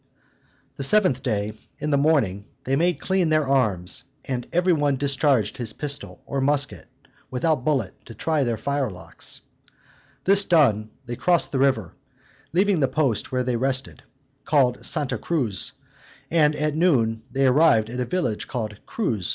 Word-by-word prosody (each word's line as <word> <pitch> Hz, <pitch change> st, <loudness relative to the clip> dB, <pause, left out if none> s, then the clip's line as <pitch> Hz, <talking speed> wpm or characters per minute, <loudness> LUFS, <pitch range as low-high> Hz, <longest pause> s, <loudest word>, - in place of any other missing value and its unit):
The 140 Hz, -, -4 dB
seventh 160 Hz, -5 st, +4 dB
day, 105 Hz, -5 st, -1 dB, 0.2 s
in 150 Hz, 0 st, -3 dB
the -, -, +4 dB
morning, 135 Hz, -10 st, +1 dB, 0.2 s
they 135 Hz, -, 0 dB
made 175 Hz, +4 st, +1 dB
clean 190 Hz, -3 st, +1 dB
their 155 Hz, -2 st, +2 dB
arms, 100 Hz, -10 st, 0 dB, 0.2 s
and 125 Hz, -2 st, -3 dB
every 180 Hz, +1 st, +3 dB
one 145 Hz, -3 st, +1 dB
discharged 135 Hz, -5 st, +1 dB
his 120 Hz, -4 st, -4 dB
pistol, 145 Hz, -1 st, -5 dB
or 140 Hz, -1 st, -2 dB
musket, 140 Hz, +1 st, 0 dB, 0.4 s
without 130 Hz, +1 st, 0 dB
bullet, 130 Hz, -10 st, 0 dB
to 115 Hz, -, -10 dB
try 155 Hz, +5 st, 0 dB
their 120 Hz, -3 st, -1 dB
firelocks. 135 Hz, -10 st, -4 dB, 0.8 s
This 195 Hz, +1 st, +4 dB
done, 130 Hz, -, +3 dB, 0.2 s
they 120 Hz, -1 st, -5 dB
crossed 175 Hz, +5 st, +1 dB
the 135 Hz, -, -1 dB
river, 130 Hz, -10 st, +1 dB, 0.6 s
leaving 190 Hz, +1 st, +2 dB
the 135 Hz, -, +3 dB
post 130 Hz, -4 st, 0 dB
where 125 Hz, -1 st, 0 dB
they 125 Hz, -, -1 dB
had 120 Hz, -1 st, -2 dB
rested, 135 Hz, 0 st, -1 dB, 0.4 s
called 135 Hz, -4 st, +2 dB
Santa 125 Hz, -5 st, 0 dB
Cruz, 125 Hz, -, 0 dB, 0.6 s
and 155 Hz, -2 st, +3 dB
at 150 Hz, 0 st, -1 dB
noon 120 Hz, -10 st, +2 dB
they 135 Hz, 0 st, +1 dB
arrived 130 Hz, -5 st, +4 dB
at 125 Hz, -, -5 dB
a 125 Hz, -, 0 dB
village 125 Hz, -7 st, -2 dB
called 110 Hz, -4 st, -5 dB
Cruz. 110 Hz, -, -1 dB
135 Hz, 160 wpm, -24 LUFS, 120-155 Hz, 0.8 s, seventh